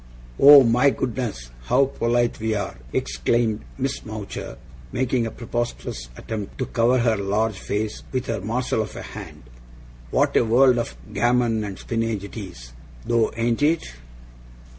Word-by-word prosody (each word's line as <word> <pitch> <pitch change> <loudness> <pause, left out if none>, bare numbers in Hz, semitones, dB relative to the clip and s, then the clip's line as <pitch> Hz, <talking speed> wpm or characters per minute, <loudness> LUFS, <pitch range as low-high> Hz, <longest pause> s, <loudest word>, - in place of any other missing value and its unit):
'Oh, 140 -1 +10
my 125 +4 +4
goodness, 115 - -3
how 135 - +4
polite 120 -2 0
we 110 0 -1
are!' 100 -11 -4
exclaimed 115 -2 0 0.2
Miss 135 0 -2
Mowcher, 105 - -7 0.3
making 125 -2 0
a - - -3
preposterous 120 - -4
attempt 105 -3 -6
to 130 - -1
cover 120 +2 +2
her 115 -2 +2
large 105 +1 -1
face 105 +3 -3
with 130 -1 -2
her 115 -3 -3
morsel 115 +3 -1
of 110 - -6
a - - -6
hand. - - -10 0.7
'What - - +1
a - - +5
world 120 +2 +4
of 115 - -4 0.2
gammon 120 -2 +2
and 100 -2 -6
spinnage 115 -3 -2
it 100 - -9
is, 85 - -9 0.3
though, 115 -2 +2
ain't 115 +1 0
it! 155 - +1
115 Hz, 150 wpm, -23 LUFS, 105-125 Hz, 0.7 s, Oh